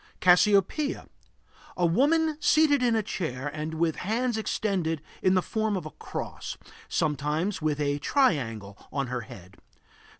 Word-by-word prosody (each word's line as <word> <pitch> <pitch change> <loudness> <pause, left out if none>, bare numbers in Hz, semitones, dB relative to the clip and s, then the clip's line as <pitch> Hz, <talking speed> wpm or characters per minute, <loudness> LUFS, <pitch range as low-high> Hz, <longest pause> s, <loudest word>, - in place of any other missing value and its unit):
CASSIOPEIA. 200 - +3 0.7
A 180 - +2
woman 300 - +3
seated 305 -3 +4
in 240 -2 +3
a 220 - +1
chair 140 -9 -4
and 155 +2 -5
with 165 0 0
hands 235 +5 -1
extended 195 -7 -1 0.2
in 185 0 +3
the 185 - +2
form 220 -2 -1
of 175 - -6
a 155 - -7
cross; - - -6 0.3
sometimes 155 +6 -1
with 150 -1 0
a 145 0 0
triangle 115 - 0
on 140 -1 -1
her 125 - -1
head. 95 -4 -13
175 Hz, 140 wpm, -27 LUFS, 150-220 Hz, 0.7 s, seated